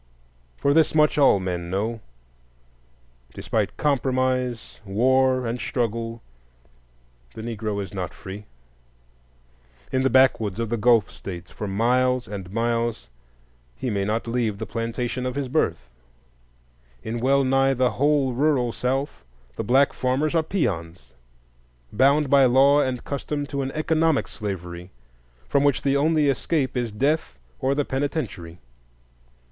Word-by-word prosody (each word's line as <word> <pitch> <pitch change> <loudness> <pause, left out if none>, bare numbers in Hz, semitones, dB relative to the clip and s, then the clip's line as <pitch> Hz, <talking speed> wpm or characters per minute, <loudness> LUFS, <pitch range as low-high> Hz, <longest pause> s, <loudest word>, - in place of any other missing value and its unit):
For 140 - +2
this 160 0 +3
much 150 -1 +3
all 135 -8 +5
men 90 -2 -4
know: 110 +5 -2 1.4
despite - - -2
compromise, 130 -4 -1
war, 130 +5 +2
and 120 +2 -3
struggle, 115 -2 -3 1.1
the 110 - -7
Negro 110 -3 -3
is 95 - -10
not 95 -2 -4
free. 100 +2 -9 1.5
In 130 - +1
the 135 - +2
backwoods 120 -6 +3
of 115 -2 -2
the 120 - 0
Gulf 115 -1 +3
States, 90 -3 -9
for 105 - -6
miles 125 +4 +1
and 95 -3 -7
miles, 115 - -1 0.7
he 125 - -3
may 100 -1 -1
not 110 +3 -1
leave 115 -3 -1
the - - -5
plantation 115 +2 -3
of 125 0 -3
his 140 -2 -2
birth; 85 - -1 1.2
in 115 +2 -4
well 135 +3 +3
nigh 135 +1 +2
the 125 -1 +2
whole 140 +2 +1
rural 130 -2 +1
South 135 +5 -2 0.3
the - - -3
black 135 +3 +3
farmers 135 +5 0
are 165 - +3
peons, 85 - -3 0.8
bound 140 +6 +3
by 140 0 +5
law 135 +3 +5
and 125 -3 -2
custom 145 +1 -3
to 140 -1 -3
an 135 - -2
economic 160 -1 +1
slavery, 90 -4 -6 0.6
from 140 - +2
which 145 -2 +2
the 140 0 +2
only 155 +1 +2
escape 140 0 0
is 120 -3 -1
death 140 +9 -1 0.2
or 135 +1 +1
the 145 -1 0
penitentiary. 130 - -3
125 Hz, 135 wpm, -24 LUFS, 110-140 Hz, 1.5 s, all